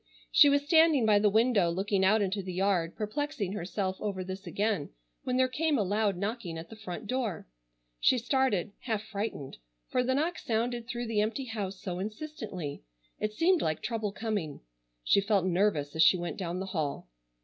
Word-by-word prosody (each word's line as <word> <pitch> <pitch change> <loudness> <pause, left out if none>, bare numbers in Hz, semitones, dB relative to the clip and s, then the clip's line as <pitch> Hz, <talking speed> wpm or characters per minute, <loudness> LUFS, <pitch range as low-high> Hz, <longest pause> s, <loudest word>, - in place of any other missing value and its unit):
She 290 - +8
was 285 0 +2
standing 315 -5 +5
by 210 -1 +5
the 210 0 +4
window 220 -4 +3
looking 190 +2 0
out 210 +2 +4
into 200 +1 -1
the 185 -1 -6
yard 185 -3 +1
perplexing 220 -2 -3
herself 190 -1 -3
over 195 -3 -2
this 190 +1 -7
again 200 -1 -1 0.4
when 255 0 0
there 260 0 +4
came 300 +3 0
a 210 - +2
loud 205 0 +1
knocking 200 -4 -3
at 165 +4 -9
the - - -8
front 215 -1 -7
door. 225 -7 -2 0.5
She 255 - +4
started, 245 -6 +1
half 220 -4 -2
frightened, 200 - -5 0.3
for 250 - +2
the 260 +1 +1
knock 325 +5 0
sounded 235 +1 -1
through 240 -1 -3
the 220 -2 +1
empty 230 +6 -1
house 200 -5 -4
so 180 -2 -4
insistently. 210 - -5 0.4
It 215 0 -2
seemed 340 - +3
like 155 -1 -1
trouble 225 -3 -2
coming. 205 -8 -3 0.4
She 200 - +4
felt 200 -2 +2
nervous 175 -6 +1
as 160 - +2
she 185 - +7
went 175 0 -4
down 180 -1 -3
the 190 - -3
hall. 150 - -2
210 Hz, 185 wpm, -30 LUFS, 185-240 Hz, 0.5 s, She